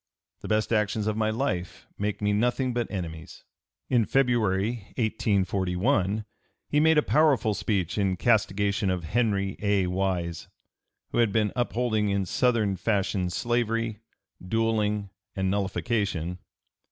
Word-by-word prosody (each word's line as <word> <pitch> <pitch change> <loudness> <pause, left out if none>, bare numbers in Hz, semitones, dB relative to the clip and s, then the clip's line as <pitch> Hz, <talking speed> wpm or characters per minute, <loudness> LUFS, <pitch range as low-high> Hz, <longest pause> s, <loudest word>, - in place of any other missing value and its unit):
The - - -8
best 110 +1 +1
actions 105 -1 +1
of 110 -1 0
my 110 0 +1
life 110 -7 -3
make 105 0 -3
me 105 0 +2
nothing 125 +4 +1
but 120 -1 -1
enemies." 85 -3 -6 0.4
In 120 -3 +3
February, 115 -4 +1
1841, 100 -1 0 0.4
he 150 - +2
made 160 +1 +4
a 150 - +5
powerful 145 -8 +3
speech 100 -2 -1
in 95 -2 +1
castigation 100 -2 +1
of 90 -2 -1
Henry 100 +1 0
A. 100 -2 +2
Wise, 90 -2 -2 0.6
who - - 0
had 115 -3 +3
been 105 -1 +1
upholding 120 -3 0
in 100 -1 0
Southern 110 -3 +1
fashion 95 -2 0
slavery, 115 +1 -1 0.4
duelling, 105 -1 0 0.2
and 95 -1 0
nullification. 100 -3 -1
105 Hz, 130 wpm, -27 LUFS, 95-115 Hz, 0.6 s, a